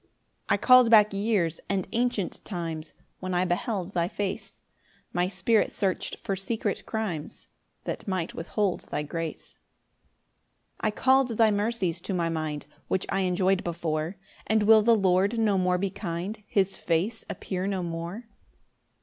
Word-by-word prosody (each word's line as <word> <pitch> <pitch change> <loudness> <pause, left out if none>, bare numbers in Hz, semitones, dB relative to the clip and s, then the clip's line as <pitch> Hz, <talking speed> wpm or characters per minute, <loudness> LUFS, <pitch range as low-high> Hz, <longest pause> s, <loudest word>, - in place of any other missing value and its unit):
5 - - -38 0.4
I - - +4
call'd 255 -2 +7
back 215 -2 +6
years 195 -5 +1
and 195 -2 0
ancient 230 -5 -1
times, 165 -4 -5 0.3
When 185 -1 -3
I 180 +1 +2
beheld 185 +1 -2
thy 170 -1 +1
face; 195 +1 -4 0.5
My 175 +1 +1
spirit 195 +4 +2
search'd 190 -2 -1
for 195 - -1
secret 205 +1 -2
crimes 195 -9 -4 0.3
That - - -5
might 185 -4 -2
withhold 185 +3 -2
thy 150 - -2
grace. 165 +1 -5
6 - - -22 1.2
I 215 - +1
call'd 260 +1 +3
thy 225 -2 +5
mercies 205 -5 0
to 190 - -3
my 170 -2 0
mind 155 -3 -3 0.2
Which 190 - 0
I 195 - 0
enjoy'd 185 0 +2
before; 165 0 -2 0.3
And 220 0 +3
will 220 +1 +7
the 230 +2 +5
Lord 195 +2 +2
no 210 -4 +2
more 180 0 +2
be 195 +1 -1
kind? 195 +2 -4
His 195 -1 +1
face 180 +7 -1
appear 185 0 -3
no 190 -2 -1
more? 170 +7 -5
190 Hz, 155 wpm, -27 LUFS, 175-215 Hz, 1.2 s, call'd